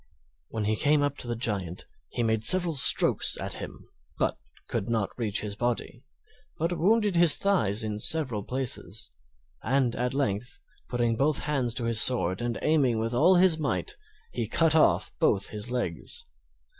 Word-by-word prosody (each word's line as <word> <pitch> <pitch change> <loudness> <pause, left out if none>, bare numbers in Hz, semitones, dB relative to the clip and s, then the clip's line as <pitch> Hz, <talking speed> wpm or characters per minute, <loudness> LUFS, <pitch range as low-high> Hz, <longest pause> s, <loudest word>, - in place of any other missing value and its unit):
When 110 -2 -4
he 110 +1 0
came 145 +4 +1
up 145 0 -2
to - - -3
the 120 - -3
Giant 100 -7 -4 0.2
he 120 - -3
made 110 -1 -1
several 175 +5 +7
strokes 135 - +3
at - - -5
him, - - -10 0.3
but - - -1 0.3
could 100 - -4
not 110 -4 -1
reach 110 -4 -2
his 105 -1 -6
body, 120 +1 -4 0.6
but 170 +3 -2
wounded 205 +3 +1
his 170 -3 +8
thighs 115 - 0
in 105 -1 -4
several 130 -7 +2
places; 110 - -5 0.5
and 125 0 0
at 125 +2 -3
length, 125 +2 -3 0.3
putting 120 -2 -1
both 140 +5 +1
hands 130 -6 -1
to 125 - -3
his 115 -1 +2
sword 95 -5 +1
and 120 -1 -3
aiming 140 -7 +1
with 115 +2 -3
all 170 +10 +4
his 175 -3 +4
might, 145 -3 -3 0.4
he - - -4
cut 165 -2 +1
off 155 - +2
both 100 0 +1
his 105 +2 -6
legs. 120 -10 -4
120 Hz, 170 wpm, -26 LUFS, 110-150 Hz, 0.6 s, his